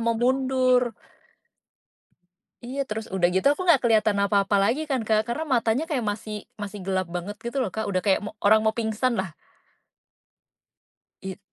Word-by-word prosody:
mau 230 Hz, 0 st, +1 dB
mundur. 255 Hz, -1 st, +2 dB, 1.7 s
Iya, 265 Hz, +3 st, -4 dB
terus 215 Hz, +1 st, -4 dB
udah 175 Hz, -2 st, +3 dB
gitu 190 Hz, -, 0 dB
aku 370 Hz, -, -5 dB
nggak 330 Hz, -7 st, +5 dB
keliatan 215 Hz, -2 st, +3 dB
apa-apa 200 Hz, 0 st, +2 dB
lagi 235 Hz, +9 st, +1 dB
kan, 265 Hz, -2 st, +1 dB
Kak. 215 Hz, -1 st, +3 dB
Karena 310 Hz, +7 st, -2 dB
matanya 235 Hz, +4 st, +1 dB
kayak 290 Hz, -7 st, -1 dB
masih 210 Hz, +1 st, -6 dB, 0.3 s
masih 205 Hz, 0 st, -6 dB
gelap 190 Hz, -1 st, 0 dB
banget 175 Hz, +4 st, -5 dB
gitu 235 Hz, +3 st, -5 dB
loh, 210 Hz, -, -2 dB
Kak, 220 Hz, -1 st, -2 dB
udah 185 Hz, -2 st, 0 dB
kayak 195 Hz, -2 st, +3 dB
mo 210 Hz, -, -5 dB, 0.2 s
orang 215 Hz, +1 st, +6 dB
mau 220 Hz, -, +2 dB
pingsanlah. 220 Hz, -3 st, -1 dB, 1.9 s
Iya. 190 Hz, -1 st, -6 dB
220 Hz, 155 wpm, -25 LUFS, 200-250 Hz, 1.9 s, orang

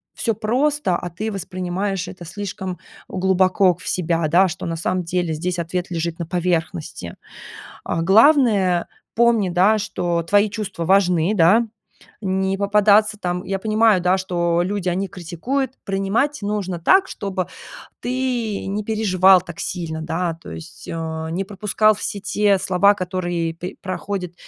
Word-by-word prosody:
всё 230 Hz, -, 0 dB
просто, 245 Hz, 0 st, 0 dB
а 175 Hz, 0 st, -5 dB
ты 215 Hz, +6 st, -4 dB
воспринимаешь 185 Hz, 0 st, -3 dB
это 175 Hz, -1 st, -9 dB
слишком 190 Hz, 0 st, -6 dB, 0.3 s
глубоко 185 Hz, 0 st, +2 dB
в 185 Hz, -, -12 dB
себя, 170 Hz, -2 st, 0 dB
да, 180 Hz, +5 st, +4 dB
что 180 Hz, +2 st, -6 dB
на 165 Hz, -, -2 dB
самом 180 Hz, +2 st, -1 dB
деле 175 Hz, -1 st, -1 dB
здесь 180 Hz, +2 st, -3 dB
ответ 180 Hz, +2 st, -3 dB
лежит 165 Hz, 0 st, -2 dB
на 170 Hz, -, -4 dB
поверхности. 170 Hz, -, -2 dB, 0.7 s
А, 165 Hz, -, -1 dB
главное, 205 Hz, -, +4 dB, 0.3 s
помни, 230 Hz, -4 st, +3 dB
да, 190 Hz, +5 st, +4 dB
что 175 Hz, -5 st, -1 dB
твои 205 Hz, +4 st, +3 dB
чувства 205 Hz, -5 st, -5 dB
важны, 180 Hz, -1 st, +3 dB
да. 210 Hz, +5 st, +4 dB, 0.6 s
Не 190 Hz, -1 st, 0 dB
попадаться 210 Hz, +1 st, +3 dB
там 180 Hz, -1 st, -3 dB
Я 195 Hz, 0 st, -2 dB
понимаю, 215 Hz, -1 st, +3 dB
да, 180 Hz, +2 st, +3 dB
что 175 Hz, -2 st, 0 dB
люди, 190 Hz, 0 st, -2 dB
они 190 Hz, +3 st, -1 dB
критикуют. 230 Hz, -, -3 dB
Принимать 200 Hz, +10 st, 0 dB
нужно 200 Hz, -3 st, -2 dB
так, 380 Hz, -, +4 dB
чтобы 190 Hz, -, -4 dB, 0.5 s
ты 245 Hz, -4 st, -2 dB
не 205 Hz, +2 st, -3 dB
переживал 195 Hz, -4 st, +4 dB
так 170 Hz, -2 st, -10 dB
сильно, 160 Hz, -3 st, -4 dB
да, 165 Hz, +2 st, -2 dB
то -, -, -10 dB
есть, 165 Hz, +1 st, -10 dB
а, 160 Hz, -1 st, -4 dB
не 185 Hz, +4 st, -2 dB
пропускал 210 Hz, +2 st, +2 dB
все 200 Hz, 0 st, -4 dB
те 205 Hz, 0 st, +2 dB
слова, 190 Hz, +2 st, +4 dB
которые 175 Hz, -3 st, -2 dB
пе 180 Hz, +2 st, -8 dB
проходят 185 Hz, -1 st, -4 dB
185 Hz, 145 wpm, -21 LUFS, 175-205 Hz, 0.7 s, да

